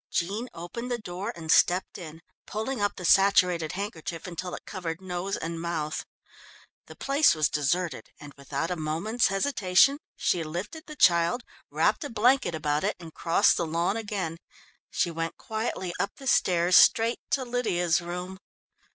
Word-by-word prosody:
Jean 205 +8 -2
opened 205 +9 -6
the 245 - -1
door 190 -3 -5
and 160 -2 -3
stepped 180 +2 +3
in, 165 -1 -10 0.2
pulling 220 +3 -3
up 205 - 0
the 180 - -7
saturated 180 -4 +4
handkerchief 170 -4 -5
until 180 0 -5
it - - -11
covered 170 -4 -5
nose 185 +1 -3
and 165 0 -5
mouth. 160 -3 -3 0.8
The - - -12
place 280 - +3
was 155 -1 +2
deserted, 165 +4 -1
and, 145 -1 -11
without 140 +4 -4
a - - 0
moment's 165 +9 0
hesitation, 195 +4 +3 0.2
she 170 - 0
lifted 185 - -6
the 305 - -9
child, 170 - +3 0.3
wrapped - - +1
a 290 - -5
blanket 240 -3 +2
about 150 -1 -1
it 205 - 0
and 165 -2 -11
crossed 170 +5 +3
the 170 - -1
lawn 170 +5 0
again. 200 -7 -3 0.5
She 175 - 0
went 165 0 -4
quietly 220 -5 -4
up 200 - -2
the 275 - -12
stairs 180 -7 +3
straight 230 +1 +5
to 265 -2 0
Lydia's 180 -9 +1
room. 180 +2 -6
180 Hz, 160 wpm, -27 LUFS, 165-215 Hz, 0.8 s, straight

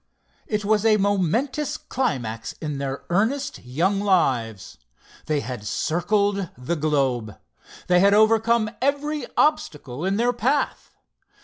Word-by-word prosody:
It 210 -1 -2
was 215 0 +2
a 220 -1 +4
momentous 205 - 0
climax 120 - -3
in 150 -3 -5
their 135 0 -4
earnest 265 +10 0
young 170 +11 0
lives. 125 - 0 0.5
They 150 -2 0
had 125 -6 -6
circled 200 - 0
the 125 +7 -2
globe. 135 - -1 0.5
They 180 0 +4
had 200 +2 +5
overcome 220 +1 +3
every 290 +2 -1
obstacle 150 - 0
in 195 +2 0
their 240 +2 +2
path. 260 +5 -1
195 Hz, 120 wpm, -23 LUFS, 140-225 Hz, 0.5 s, had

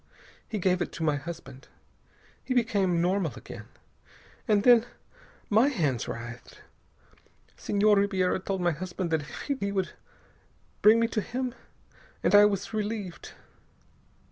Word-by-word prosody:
He 215 - -3
gave 185 -1 +1
it - - -2
to 165 - -5
my 150 -2 +2
husband. 150 -3 -9 0.8
He 255 - -2
became 195 -7 +2
normal 180 -5 0
again. - - -10 0.8
And 205 -1 +3
then 240 -1 +6 0.6
my 220 +5 +4
hands 150 - -1
writhed. 120 +1 -8 1.0
Senhor 210 +1 +2
Ribiera 190 -2 +1
told 190 0 -3
my 175 0 +2
husband 175 +2 -4
that 160 -1 +1
if 145 - -9 0.2
he 200 0 -1
would 190 -2 -1 0.9
bring 220 +2 +7
me 230 - +3
to 215 - -1
him.... 250 +3 -3 0.7
And - - +2
I 205 0 +9
was 205 +1 -1
relieved. 210 -4 -4
195 Hz, 135 wpm, -28 LUFS, 170-215 Hz, 1.0 s, I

